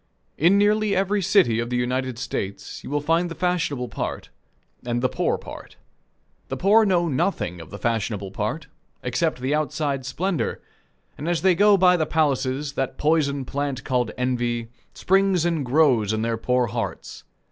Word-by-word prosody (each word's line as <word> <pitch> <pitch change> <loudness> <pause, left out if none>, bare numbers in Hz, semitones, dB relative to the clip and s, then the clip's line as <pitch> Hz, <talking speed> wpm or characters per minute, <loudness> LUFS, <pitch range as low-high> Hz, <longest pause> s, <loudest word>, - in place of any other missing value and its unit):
In 175 +6 +4
nearly 210 0 +2
every 195 +2 +1
city 170 - +3
of 120 0 -2
the 125 - -2
United 125 0 -1
States 100 -6 -5
you - - -8
will 145 +1 -1
find 165 +4 +1
the 165 - -7
fashionable 165 -9 -1
part, - - -5 0.5
and 120 0 -1
the 130 - +2
poor - - 0
part. - - -11 0.7
The - - -4
poor 215 +4 +5
know 175 -3 +2
nothing 130 - -1
of 80 - -12
the 100 - -8
fashionable 105 -4 -2
part, 110 +11 -3 0.4
except 125 +3 -1
the 130 +3 0
outside 145 -2 -1
splendor; 180 +5 -2 0.6
and 155 +4 -3
as 175 0 0
they 190 -1 +5
go 205 +3 +5
by 180 -1 +5
the 155 -2 0
palaces, 140 -2 0
that 135 -2 -3
poison 145 -3 +1
plant 140 0 -3
called 125 -3 0
envy, 120 -2 -1 0.3
springs 190 -2 +2
and 165 -4 0
grows 125 -6 +3
in 110 0 -1
their 115 0 0
poor 125 +2 +1
hearts. 115 0 -5
140 Hz, 170 wpm, -23 LUFS, 120-175 Hz, 0.7 s, poor